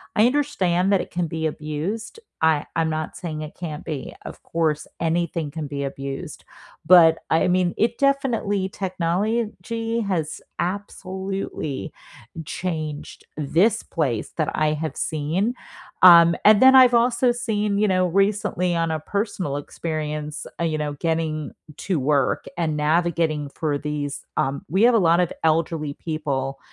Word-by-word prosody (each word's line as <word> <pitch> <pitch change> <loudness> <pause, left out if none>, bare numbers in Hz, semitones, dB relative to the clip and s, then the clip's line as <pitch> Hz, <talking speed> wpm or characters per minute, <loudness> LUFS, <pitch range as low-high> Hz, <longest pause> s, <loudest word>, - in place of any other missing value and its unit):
I 215 +3 +5
understand 195 -10 +1
that 195 - +3
it - - -8
can 175 0 -1
be 160 0 -2
abused. 155 - -4 0.2
I 160 -2 +3
I'm 165 -1 +1
not 155 0 -4
saying 155 -4 -5
it 155 0 -8
can't 155 -4 -6
be. 145 -5 -6
Of - - -9
course, 155 -3 -1
anything 165 -1 -1
can 155 0 -5
be 140 0 -4
abused. 135 0 -6 0.4
But, 165 -3 +7
I 165 +3 +3
mean, 180 -1 +2
it 230 +2 +1
definitely 245 -9 +1
Technology 220 +5 -2
has 160 -5 -2 0.2
absolutely 190 - -4 0.5
changed 155 -4 -5
this 175 +10 +2
place 135 -10 -2
that 155 -3 0
I 155 0 +2
have 155 +1 -4
seen. 165 +10 -1 0.5
Um, 170 -2 +9
and 210 0 +7
then 265 0 +8
I've 255 -2 +8
also 240 +1 +3
seen, 210 -4 -1
you 210 +1 +3
know, 185 -1 +2
recently 195 -1 +1
on 165 -1 0
a 160 - -1
personal 200 -4 -3
experience, 150 0 -4
uh, - - 0
you 155 -1 -1
know, 150 -1 -2
getting 155 0 -2 0.2
to 185 -4 -1
work 140 +1 +1
and 155 -3 -1
navigating 155 -1 +1
for 150 -3 -1
these 145 -1 -4
Um, 135 +1 -1
we 190 +7 +2
have 245 +1 +6
a - - +6
lot 170 -2 +4
of 175 - 0
elderly 160 -2 +1
people, 140 -4 -3
165 Hz, 150 wpm, -23 LUFS, 155-195 Hz, 0.5 s, Um